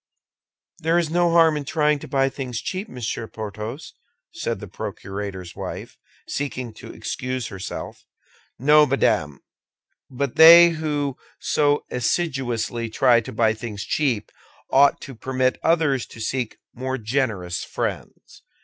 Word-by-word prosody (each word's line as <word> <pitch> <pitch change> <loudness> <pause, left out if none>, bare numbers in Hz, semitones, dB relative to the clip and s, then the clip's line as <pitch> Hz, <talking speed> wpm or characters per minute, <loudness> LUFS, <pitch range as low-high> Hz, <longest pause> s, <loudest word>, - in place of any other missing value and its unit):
"There 165 +2 +2
is 165 -3 0
no 175 0 +3
harm 165 -2 +5
in 150 - -3
trying 150 0 +1
to - - -9
buy 135 -1 +2
things 130 -4 -4
cheap, 190 +3 -4
Monsieur 115 -2 -4
Porthos," 110 +6 -7 0.4
said - - -3
the - - -8
procurator's 95 -3 -6
wife, - - -7 0.3
seeking 130 -5 -4
to - - -11
excuse 130 -2 -4
herself. 95 -1 -7 0.5
"No, 150 +3 +5
madame; 75 - +1 0.7
but 135 0 -3
they 170 +2 +10
who 150 -4 -2 0.2
so 145 0 +1
assiduously 120 -4 -1
try 120 +1 +4
to - - -8
buy 110 0 +2
things 110 -2 -6
cheap 125 -9 0 0.4
ought 140 +1 +5
to 135 - -8
permit 130 +2 -1
others 155 -6 +2
to - - -13
seek 120 +1 -2 0.2
more 130 +2 -3
generous 110 -7 -2
friends." - - -5
130 Hz, 130 wpm, -23 LUFS, 115-150 Hz, 0.7 s, they